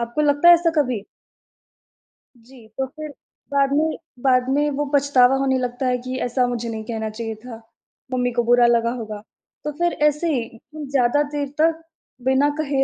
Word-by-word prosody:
आपको 235 +5 -3
लगता 290 +4 +4
है 345 - +11
ऐसा 335 0 +2
कभी? 245 -7 -2 1.3
जी, 235 -1 -17
तो 265 - 0
फिर 305 +3 -9 0.4
बाद 275 -1 +2
में 315 +1 +1 0.3
बाद 255 -1 +3
में 295 +1 +2
वो 295 - 0
पछतावा 270 -2 +4
होने 270 -1 +1
लगता 250 +1 -3
है 250 0 +1
कि 255 0 -4
ऐसा 250 +1 +1
मुझे 240 -1 -3
नहीं 220 -1 -5
कहना 220 -2 -4
चाहिए 225 0 -5
था, 225 0 -11 0.5
मम्मी 245 -1 0
को 240 0 0
बुरा 240 +1 +4
लगा 235 0 +2
होगा। 215 -2 -7 0.4
तो 300 - -3
फिर 345 0 +1
ऐसे 300 +3 0
ही 235 -3 -1 0.3
उ 305 -2 -6
ज़्यादा 275 +1 +2
देर 285 -1 -1
तक 325 0 +2 0.4
बिना 265 +2 +3
कहे 280 -3 0
255 Hz, 180 wpm, -21 LUFS, 235-290 Hz, 1.3 s, है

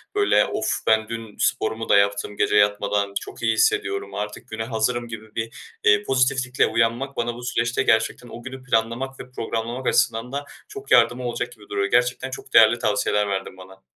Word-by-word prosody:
böyle, 410 -1 +4
"Of! - - -2
Ben 110 0 +3
dün 115 -2 -7
sporumu 110 +1 -1
da 100 - +6
yaptım 100 0 0
gece 105 - +1
yatmadan. 100 -1 +2
Çok - - -10
iyi 110 -1 +3
hissediyorum. 405 - 0
Artık 105 +4 -5
güne 110 0 -4
hazırım." 120 +1 -1
gibi 110 -1 -10
bir, 115 0 -6
eee, 105 0 +4
pozitiflikle 130 0 +1
uyanmak, 115 +5 0
bana 120 0 -1
bu 120 - -10
süreçte 120 -1 0
gerçekten 110 +2 +1
o 120 +1 -10
günü 130 0 -8
planlamak 125 +3 -1
ve 125 - -10
programlamak 115 +2 -4
açısından 115 +3 +1
da 140 +1 -4 0.2
çok 410 0 -10
yardımı 125 +1 +4
olacak 125 0 -3
gibi 105 -4 -17
duruyor. 100 0 -1
Gerçekten 125 +2 +1
çok 130 0 -9
değerli 115 +1 +7
tavsiyeler 105 -2 +1
verdin 95 -1 -4
bana. 95 +1 -14
115 Hz, 180 wpm, -23 LUFS, 105-125 Hz, 0.2 s, değerli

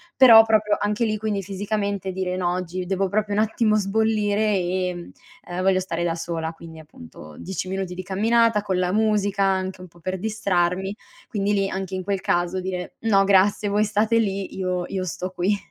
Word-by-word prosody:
però 230 -4 +9
proprio 215 -1 +2
anche 210 +2 0
lì, 215 -2 0
quindi, 210 -2 -2
fisicamente 200 0 -3
dire: 185 -1 -3
"No 175 -1 0
oggi 180 0 -4
devo 195 +1 0
proprio 205 +1 -1
un 205 - +1
attimo 220 0 +2
sbollire, 210 0 +1
ehm, 180 -1 -3 0.4
ehm, 175 +1 -3
voglio 190 0 +3
stare 175 -2 -3
da 170 -1 0
sola." 165 -1 -4
Quindi 165 0 -12
appunto 80 - -13
10 190 0 -5
minuti 190 -1 -4
di 185 - -6
camminata 220 +3 +2
con 190 -3 -2
la 180 0 0
musica 210 -2 +1
anche 190 -1 -1
un 185 - -10
po' 175 0 -21
per 185 +2 -4
distrarmi, 190 -2 -1 0.3
quindi 205 -1 -1
lì, 195 -1 +1
anche 190 0 -4
in 185 - -4
quel 195 0 -2
caso, 175 0 0
dire: 180 -1 -5
"No 205 -3 +3
grazie 200 +1 +3
voi 205 +1 +2
state 215 +2 +2
lì 195 -3 -2
io 185 -1 -2
io 190 -1 -3
sto 185 +1 -4
qui." 185 +3 0
195 Hz, 190 wpm, -23 LUFS, 180-210 Hz, 0.4 s, però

